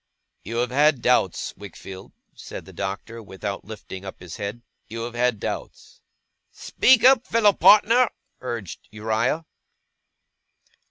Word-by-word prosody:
'You 115 - -6
have 125 +1 0
had 145 -1 +3
doubts, 125 -8 +1
Wickfield,' 95 0 -11 0.2
said - - -9
the - - -13
Doctor, 100 +4 -5
without 100 -1 -6
lifting 100 -3 -9
up 95 - -9
his 90 -2 -9
head. 105 +3 -6 0.2
'You 115 +1 -6
have 120 0 -6
had 120 -2 0
doubts.' - - -7 0.5
'Speak 260 -3 +3
up, 255 -1 +5
fellow 215 -3 +4
partner,' 230 +4 +5 0.3
urged 120 -7 -6
Uriah. 110 +9 -1
115 Hz, 125 wpm, -23 LUFS, 100-150 Hz, 0.5 s, up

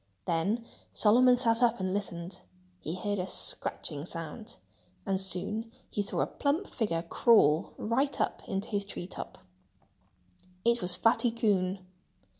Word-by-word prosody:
Then 200 +8 0 0.3
Solomon 245 +4 +6
sat 230 -1 +2
up 235 -2 +3
and 185 0 -1
listened. 185 -2 -4 0.4
He 160 - -4
heard 205 +1 -2
a 180 - -2
scratching 150 -4 -2
sound. 165 +7 -7 0.5
And 195 -2 0
soon 210 +5 -2 0.2
he 205 - 0
saw 200 - -1
a - - +3
plump 300 +7 0
figure 190 - -1
crawl 170 - +4
right 265 +5 0
up - - 0
into 195 0 -2
his 205 -2 0
tree 200 -3 -6
top. 185 - -8 1.3
It 235 0 +3
was 180 0 +3
Fatty 230 +5 +3
Coon! 195 -5 0
205 Hz, 140 wpm, -30 LUFS, 180-230 Hz, 1.3 s, Solomon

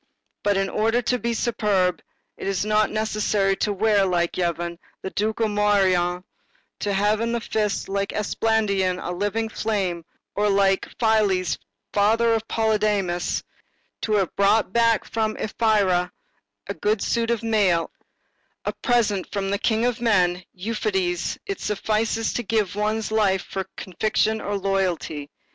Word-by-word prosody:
But, 205 -1 +2
in 195 0 +1
order 225 +4 +1
to 250 +2 0
be 235 0 -1
superb, 205 -6 +1 0.3
it - - -6
is 195 0 0
not 215 0 +2
necessary 215 -2 +1
to 210 - 0
wear, 205 0 +3
like 175 -2 0
Yvon, 170 -1 -2 0.2
the 190 - -4
ducal 220 +2 0
morion, 190 -4 +2 0.6
to 205 - -1
have 205 +2 +2
in 230 0 0
the 235 - 0
fist, 210 -3 -1
like 200 0 -1
Esplandian, 205 -3 +1
a 180 - -4
living 205 +5 -1
flame, 195 -6 -2 0.3
or, 210 +1 +1
like 195 -1 +2
Phyles, 205 -7 +2 0.3
father 225 +3 +3
of 225 0 -1
Polydamas, 210 -5 0 0.6
to 215 - -1
have 195 -4 +1
brought 200 0 +3
back 230 -1 +3
from 220 -1 -1
Ephyra 200 -5 +1 0.6
a 200 - -4
good 210 +4 0
suit 230 -1 0
of 235 -1 0
mail, 200 -7 +2 0.7
a - - -1
present 215 -6 0
from 195 -1 -2
the 200 - 0
king 225 0 +1
of 245 -2 -1
men, 185 -6 +2
Euphetes; 190 -3 -1
it 395 -2 -4
suffices 220 +2 -1
to - - -1
give 210 -3 0
one's 215 +1 -1
life 200 -4 +2
for 195 - -6
a 190 - -2
conviction 215 +4 0
or - - -5
a - - +1
loyalty. 185 -7 -1
205 Hz, 150 wpm, -23 LUFS, 190-220 Hz, 0.7 s, wear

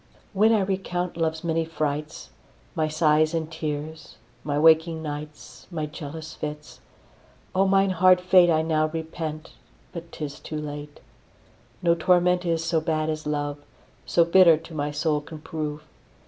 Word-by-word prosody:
When 215 +3 +4
I 220 -2 +3
recount 185 -2 -2
love's 160 -1 -2
many 165 -1 0
frights, 155 -1 -4 0.4
My 155 - 0
sighs 155 +1 +2
and 160 0 -3
tears, 155 0 -5 0.3
my 145 -1 -2
waking 160 +1 +4
nights, 150 0 -8
My 160 -4 -3
jealous 155 +1 -8
fits; 150 0 -7 0.7
O 195 +1 +3
mine 195 0 +3
hard 185 0 +5
fate 180 -1 +5
I 160 -1 +3
now 155 -1 +1
repent, 160 -1 -6 0.4
but 170 -1 -8
'tis 145 -2 -6
too 155 - -6
late. 145 -1 -7 0.8
No 170 -1 +4
torment 180 +1 +2
is 165 -1 0
so 165 -1 +1
bad 155 0 -1
as 155 -1 -5
love, 145 -1 -2 0.5
So 170 - +4
bitter 170 -2 +6
to 165 +1 -12
my 145 -1 -2
soul 150 0 0
can 155 +2 -10
prove. 150 -1 -5
160 Hz, 150 wpm, -25 LUFS, 150-170 Hz, 0.8 s, bitter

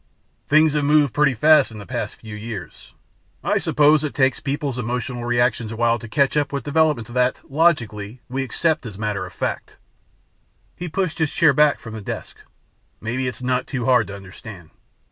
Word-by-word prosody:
Things 155 0 +4
have 150 -1 +1
moved 145 -2 +3
pretty 145 -3 +3
fast 155 +6 +5
in 110 - -10
the 100 - -9
past - - -4
few 110 -1 -10
years. 105 -4 -8 0.5
I - - +1
suppose 150 +1 +4
it 150 - -4
takes 130 -2 +2
people's 140 -2 -3
emotional 125 0 -3
reactions 120 -2 +1
a - - -5
while 120 +1 +2
to 115 - -9
catch 140 +5 +1
up 145 -2 +1
with 140 -1 -3
developments 145 -6 +1
that, 125 +1 +1
logically, 120 -8 +1
we 135 +2 -3
accept 150 0 0
as 100 -4 -9
matter 105 -3 -2
of 90 - -14
fact." - - -4 1.0
He 175 0 -6
pushed 180 -1 -2
his 160 -2 +2
chair 160 -4 +4
back 150 +1 +4
from 115 - -9
the 110 - -6
desk, - - -6 0.6
"Maybe 125 +4 -2
it's 125 0 -5
not 125 0 0
too 125 -4 -3
hard 125 -5 +3
to 100 - -7
understand. 95 -2 -11
125 Hz, 185 wpm, -22 LUFS, 110-150 Hz, 1.0 s, fast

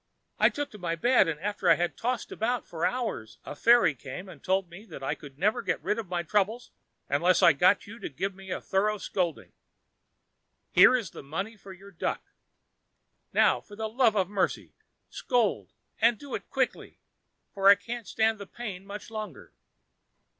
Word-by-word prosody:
I - - +6
took 290 0 -4
to 210 - -11
my 170 -2 -2
bed, 240 +3 +4
and 155 -2 -2
after 205 +1 -1
I - - +8
had 175 0 -1
tossed 245 0 -2
about 240 +2 -1
for 165 0 -1
hours 220 - -4
a - - -7
fairy 230 -3 +5
came 140 +8 -8
and - - -13
told 190 0 +1
me 175 +4 -12
that 135 - -10
I 135 - 0
could 140 -2 -12
never 210 +8 +1
get - - -1
rid 215 - 0
of 215 -6 -6
my 175 -1 -1
trouble 210 +6 0 0.4
unless 170 +6 +3
I 165 - +8
got 180 +8 +3
you 225 +3 -11
to - - -5
give 190 +7 -3
me 190 0 -13
a - - -2
thorough 210 +2 0
scolding. 180 -4 -3 1.2
Here - - +7
is 225 -9 -2
the - - -9
money 190 +11 -5
for 200 -2 -13
your 195 +2 -13
duck. 170 - -3 1.1
Now - - +3
for 205 - -14
the 220 +1 -3
love 230 0 +2
of 190 -3 +2
mercy, 195 -1 -2 0.3
scold, 240 -6 0 0.3
and 230 0 +4
do 285 +2 -10
it - - -5
quickly, - - -2 0.6
for 195 -1 +2
I 200 - +10
can't 230 +2 -7
stand 220 -1 +1
the 200 - -8
pain 195 -5 -7
much 210 +2 -8
longer." 215 -8 -7
200 Hz, 190 wpm, -28 LUFS, 180-225 Hz, 1.2 s, I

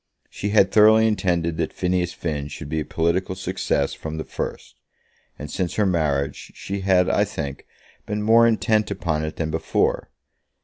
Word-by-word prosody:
She 100 - -3
had 100 -2 +4
thoroughly 110 +1 +6
intended 85 -6 0
that 85 - -1
Phineas 90 -1 -1
Finn 75 -5 -4
should 75 0 -8
be 80 +1 -1
a - - -1
political 85 +3 -1
success 95 -6 -1
from 80 0 -6
the 80 - -3
first; - - -6 0.6
and 75 0 -8
since 90 -3 -2
her 105 - +2
marriage, 75 -6 -1
she 100 +1 -5
had, 95 -2 +3
I - - +3
think, 70 -1 -6 0.4
been 105 0 -2
more 115 +2 +6
intent 110 -1 +1
upon 75 -2 -2
it 80 - -4
than 80 -1 -3
before. 80 0 0
90 Hz, 170 wpm, -23 LUFS, 80-100 Hz, 0.6 s, thoroughly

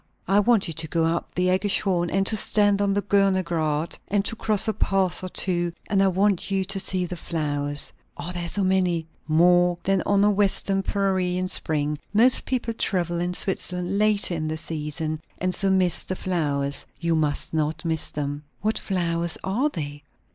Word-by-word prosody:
I 195 +2 +4
want 210 -2 +3
you 165 - -3
to 160 +1 -4
go 165 +1 0
up 165 +1 -1
the 180 +1 +1
AEggischhorn, 185 -2 +1
and 195 +2 +1
to 220 - +3
stand 205 -1 +3
on 200 -1 +2
the 205 - 0
Görner 195 -2 +2
Grät, 160 -2 -2
and 200 0 0
to - - -2
cross 215 -2 +2
a 220 - +1
pass 190 -3 +1
or 185 - -4
two; 175 -2 -1 0.2
and 195 -1 +2
I 195 - +4
want 195 +1 +1
you 195 -1 0
to 195 +1 -1
see 185 -1 0
the 180 - -5
flowers." 145 -4 -2 0.2
"Are 180 - -5
there 175 -1 -2
so 200 +3 -1
many?" 180 -3 +1 0.2
"More 175 +2 +4
than 195 -1 +1
on 200 0 +3
a 210 - +5
western 195 -1 +1
prairie 190 -2 0
in 185 0 -1
spring. 150 -4 -1 0.2
Most 240 +4 +4
people 240 -3 -2
travel 175 -6 -1
in 175 +1 -2
Switzerland 180 0 -2
later 210 -3 +3
in 155 -2 -2
the 155 0 -3
season, 155 0 -3 0.2
and 185 0 -1
so 195 - +1
miss 185 -3 +2
the 185 - -4
flowers. 145 -7 -2
You 170 -1 0
must 155 -2 -1
not 160 +2 -1
miss 160 -1 -1
them." 145 0 -4 0.2
"What 215 +1 0
flowers 170 -3 -1
are 235 +11 0
they?" 145 - -6
180 Hz, 190 wpm, -24 LUFS, 165-195 Hz, 0.2 s, a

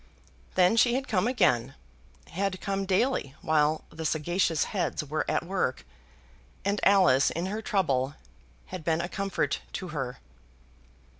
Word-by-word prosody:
Then 185 +4 +4
she 240 +1 +4
had 270 +1 -2
come 210 0 +1
again, 125 - +2 0.6
had 190 +1 -2
come 195 -1 -2
daily 190 - +1
while 155 0 +2
the 160 +1 -7
sagacious 165 +1 +1
heads 180 -4 -1
were 150 +2 -2
at - - 0
work, 175 - -1 0.8
and 200 +1 +1
Alice 185 -10 +5
in 170 +2 -3
her 210 +3 -3
trouble 140 - 0 0.6
had 180 -3 -5
been 160 0 +1
a 175 - -3
comfort 195 +1 -2
to 185 -2 -5
her. 135 -5 -4
180 Hz, 140 wpm, -28 LUFS, 155-195 Hz, 0.8 s, Alice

